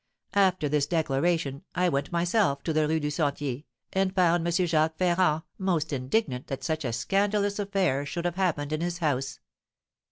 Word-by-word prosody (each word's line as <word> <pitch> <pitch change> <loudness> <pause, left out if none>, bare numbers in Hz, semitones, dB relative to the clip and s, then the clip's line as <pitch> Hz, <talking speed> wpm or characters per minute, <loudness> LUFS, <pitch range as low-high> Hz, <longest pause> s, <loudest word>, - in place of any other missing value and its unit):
After 185 -6 +3
this 145 -1 +1
declaration 155 -2 0
I 180 0 +2
went 140 -4 -1
myself 170 -4 +1
to 160 - -1
the 155 -1 +2
Rue 160 +1 +1
du 150 -1 -2
Sentier, 145 -2 -2 0.3
and 190 0 +1
found 175 -2 +3
M. - - +1
Jacques 160 -2 +1
Ferrand 175 -3 +2 0.2
most 170 -5 0
indignant 130 - -1
that 135 - -5
such 155 -1 -1
a 120 - -1
scandalous 200 - 0
affair 195 -9 +1
should 170 +4 -4
have 175 - 0
happened 160 -6 -1
in 155 - -1
his 175 0 -2
house. 135 -5 -1
160 Hz, 170 wpm, -27 LUFS, 145-180 Hz, 0.3 s, After